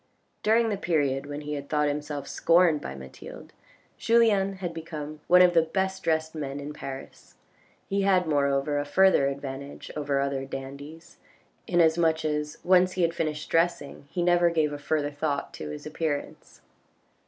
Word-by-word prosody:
During 225 +1 +3
the 205 - -1
period 145 -6 0
when 145 +1 -5
he 150 -1 -4
thought 150 +1 0
himself 145 -1 -4
scorned 170 -3 +3
by 65 - -6
Mathilde, 65 -1 -11 0.5
Julien 215 -4 +3
had 185 -3 -5
become 155 -2 -7
one 180 0 +7
of 180 -1 +4
the 165 - +5
best 190 +3 -2
dressed 160 -1 0
men 145 -3 -5
in 145 +1 -6
Paris. 135 -2 -9 0.5
He 200 0 0
had, 190 -2 +3
moreover, 145 -1 +1
a - - -1
further 190 -2 +4
advantage 140 0 -6
over 145 -2 -1
other 140 -1 -1
dandies, 140 +4 -9 0.5
in 175 - +1
as 160 +1 +3
much 160 -1 +2
as 150 -1 -2
once 185 0 +4
he 185 - 0
had 165 0 +2
finished 155 -2 -3
dressing 165 -4 0
he 175 - -2
never 175 0 +4
gave 155 -3 0
a 145 - -6
further 145 0 -1
thought 145 -1 -3
to 75 - -7
his 75 0 -7
appearance. 155 -1 -4
155 Hz, 165 wpm, -27 LUFS, 145-175 Hz, 0.5 s, one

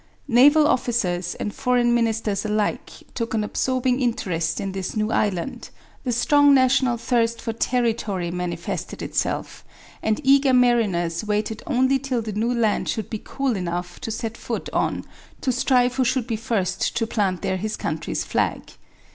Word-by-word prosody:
Naval 290 +5 +6
officers 180 -10 0
and 210 - -4
foreign 245 -1 +2
ministers 225 -4 0
alike 215 +2 -1 0.2
took 230 -2 -3
an 215 - +1
absorbing 255 +3 0
interest 180 -9 -1
in 195 -2 -3
this 190 +1 -4
new 215 0 0
island. 215 +5 -1 0.4
The 250 - 0
strong 285 +4 +5
national 260 -2 +3
thirst 230 -1 0
for 225 - -3
territory 220 -7 -1
manifested 180 +1 -4
itself - - -2 0.4
and 220 -1 0
eager 270 0 +5
mariners 210 -9 +2
waited 215 +1 -2
only 265 -1 +2
till 255 -3 -2
the 215 -1 -5
new 225 +4 0
land 230 -3 +1
should 220 - -3
be 220 - -4
cool 270 -4 -1
enough 175 -1 -4
to - - -4
set 225 +1 -4
foot - - -5
on - - 0 0.4
to 260 - +1
strive 250 0 +2
who 260 - +3
should 255 -1 0
be 230 - -2
first 215 -4 -1
to 230 - +1
plant 195 -5 -1
there 190 - 0
his 215 +3 -3
country's - - -3
flag. - - -1
230 Hz, 160 wpm, -23 LUFS, 205-250 Hz, 0.4 s, Naval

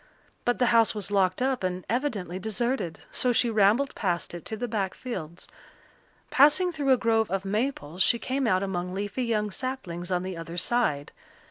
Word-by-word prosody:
But 245 - +2
the 250 - +3
house 230 -1 +4
was 205 -1 -4
locked 190 +2 +2
up 260 -4 0
and 185 0 -2
evidently 215 - -2
deserted, 220 -2 -2
so 250 - +1
she 240 0 +2
rambled 220 +6 +3
past 175 -4 -2
it 175 - -8
to 220 - -5
the 245 - -3
back 205 -4 -2
fields. 180 -9 -7 0.8
Passing 300 +6 +5
through 290 -5 0
a 260 - +6
grove 225 -2 +2
of 195 +1 -2
maples 195 - -2
she 235 - +5
came 265 +2 -1
out 185 -2 +2
among 180 -1 -3
leafy 205 +5 -3
young 210 -3 0
saplings 190 -9 -5
on 180 -1 0
the 185 -1 -4
other 165 +1 -7
side. 180 -8 +1
210 Hz, 185 wpm, -27 LUFS, 185-245 Hz, 0.8 s, a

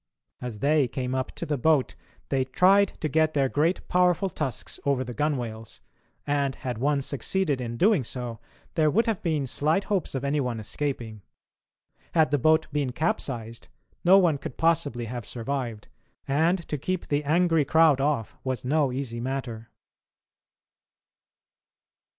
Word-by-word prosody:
As 125 -4 -5
they 145 +3 +3
came 125 +1 -3
up 130 -1 -2
to - - -5
the 150 -4 -2
boat, 150 -1 +2 0.4
they 135 -1 +1
tried 190 +9 +4
to 155 - 0
get 155 +1 +1
their 135 -2 +3
great 155 +7 0
powerful 180 +1 +2
tusks 145 -5 -5
over 140 -2 +1
the 125 -1 -7
gunwales, 120 - -3 0.5
and, 140 -2 0
had 125 -4 -5
one 140 +1 +1
succeeded 145 +2 -1
in 120 -1 -4
doing 195 - +4
so, 120 -1 -5 0.3
there 155 -3 +3
would 225 +9 +2
have 225 -4 -1
been 155 -5 0
slight 155 +8 +1
hopes 195 -9 -1
of 135 - -2
any 140 +2 0
one 125 -4 -2
escaping. 115 -1 -4 0.9
Had 160 -3 +4
the 145 - +2
boat 155 +4 +4
been 145 -3 -1
capsized, 120 -6 -3 0.4
no 185 +3 +7
one 170 -7 +3
could 130 - -7
possibly 145 -7 +1
have 120 +1 -5
survived, 120 -1 -4 0.4
and 165 +5 +1
to 150 - -3
keep 185 +5 -2
the 145 0 +1
angry 165 +1 +3
crowd 155 -2 +4
off 140 -7 -1
was 130 -1 -3
no 145 0 +2
easy 125 -3 -4
matter. 120 -3 -4
140 Hz, 155 wpm, -26 LUFS, 125-160 Hz, 0.9 s, no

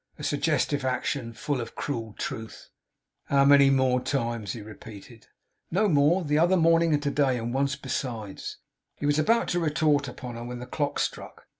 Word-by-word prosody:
A 150 - -9
suggestive 145 -1 0
action! 130 -1 -2
Full 130 +3 -3
of 115 - -5
a - - -25
cruel 115 -6 -4
truth! 110 0 -6 0.5
'How 140 0 +3
many 140 -1 +7
more 130 -2 +2
times?' 115 -6 -2
he 115 - -7
repeated. 110 +1 -12 0.4
'No 205 +5 +2
more. 160 +2 +3
The 150 0 +1
other 175 +3 +4
morning, 165 0 +4
and 145 -1 +1
to 145 - 0
day, 135 -4 +2
and 120 +1 -4
once 140 +1 0
besides.' 115 -7 -5 0.4
He - - -5
was 145 +1 +2
about 230 +9 +2
to 175 - +1
retort 150 -3 +1
upon 125 -1 -7
her, 115 - -6
when 125 +1 -6
the 125 - -7
clock 145 +3 -2
struck. - - -4
140 Hz, 185 wpm, -27 LUFS, 120-150 Hz, 0.5 s, many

